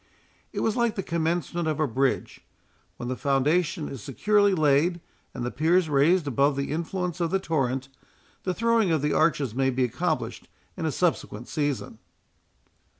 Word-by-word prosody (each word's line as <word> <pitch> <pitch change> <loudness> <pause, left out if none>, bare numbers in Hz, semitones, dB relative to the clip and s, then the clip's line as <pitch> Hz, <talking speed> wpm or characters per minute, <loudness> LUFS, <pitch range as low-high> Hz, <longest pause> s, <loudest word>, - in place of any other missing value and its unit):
It - - -3
was 220 - +1
like 235 -2 +1
the 195 - -3
commencement 170 0 -1
of 155 -1 -1
a 155 - +3
bridge; 135 +2 -1 0.5
when 120 - -5
the 130 - -2
foundation 150 +5 +1
is 135 -5 -7
securely 205 - +2
laid, 155 +3 +3 0.3
and 120 -2 -5
the 125 - -2
piers 165 +3 +2
raised 150 +5 +3
above 140 +1 +2
the 140 0 -2
influence 175 +2 -3
of 170 - +1
the 195 - +2
torrent, 135 -8 -1 0.5
the 185 -1 -2
throwing 230 -3 +2
of 160 -3 +1
the 150 - +1
arches 140 -8 +2
may 135 +2 +1
be 130 0 0
accomplished 125 - -2 0.3
in - - -2
a - - 0
subsequent 110 +4 -1
season. 145 -4 -2
155 Hz, 165 wpm, -26 LUFS, 135-180 Hz, 0.5 s, a